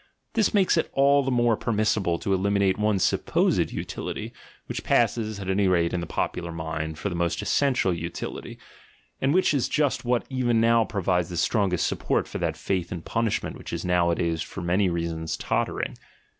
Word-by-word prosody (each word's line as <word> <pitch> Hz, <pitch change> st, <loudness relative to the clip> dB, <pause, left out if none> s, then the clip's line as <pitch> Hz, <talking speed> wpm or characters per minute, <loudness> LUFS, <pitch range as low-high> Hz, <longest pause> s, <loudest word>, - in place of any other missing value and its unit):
This 220 Hz, -2 st, +2 dB
makes 190 Hz, -4 st, +3 dB
it 165 Hz, -, +1 dB
all 140 Hz, +1 st, +4 dB
the 135 Hz, -, -2 dB
more 120 Hz, -2 st, +3 dB
permissible 105 Hz, -6 st, 0 dB
to 95 Hz, -, -1 dB
eliminate 100 Hz, 0 st, +1 dB
one 105 Hz, -1 st, +2 dB
supposed 95 Hz, -, +1 dB
utility, -, -, -5 dB, 0.3 s
which -, -, -5 dB
passes, 110 Hz, -3 st, +1 dB
at 95 Hz, -, -6 dB
any 95 Hz, +1 st, +2 dB
rate 85 Hz, -2 st, +2 dB
in 90 Hz, -, 0 dB
the 85 Hz, -, -5 dB
popular 85 Hz, -1 st, -3 dB
mind. 80 Hz, -1 st, -4 dB
for 100 Hz, -, -3 dB
its 85 Hz, -, -4 dB
most 85 Hz, -1 st, 0 dB
essential 130 Hz, -10 st, +2 dB
utility, 85 Hz, 0 st, -6 dB, 0.6 s
and 135 Hz, -, +2 dB
which 185 Hz, 0 st, +3 dB
is 135 Hz, -4 st, +1 dB
just 150 Hz, -3 st, +1 dB
what 120 Hz, -1 st, 0 dB
even 125 Hz, -3 st, +1 dB
now 115 Hz, 0 st, +4 dB
provides 90 Hz, -4 st, 0 dB
the 85 Hz, -, -5 dB
strongest 90 Hz, -1 st, +1 dB
support -, -, 0 dB
for -, -, -5 dB
that -, -, -1 dB
faith 90 Hz, -3 st, -2 dB
in 85 Hz, -2 st, -5 dB
pun 115 Hz, 0 st, 0 dB
ishment 105 Hz, -, -2 dB
which -, -, -9 dB
is -, -, -4 dB
nowadays 85 Hz, -2 st, +1 dB
for 100 Hz, -, -6 dB
many 90 Hz, +2 st, +2 dB
reasons 85 Hz, -1 st, -3 dB
tottering. -, -, -2 dB
95 Hz, 185 wpm, -25 LUFS, 85-115 Hz, 0.6 s, all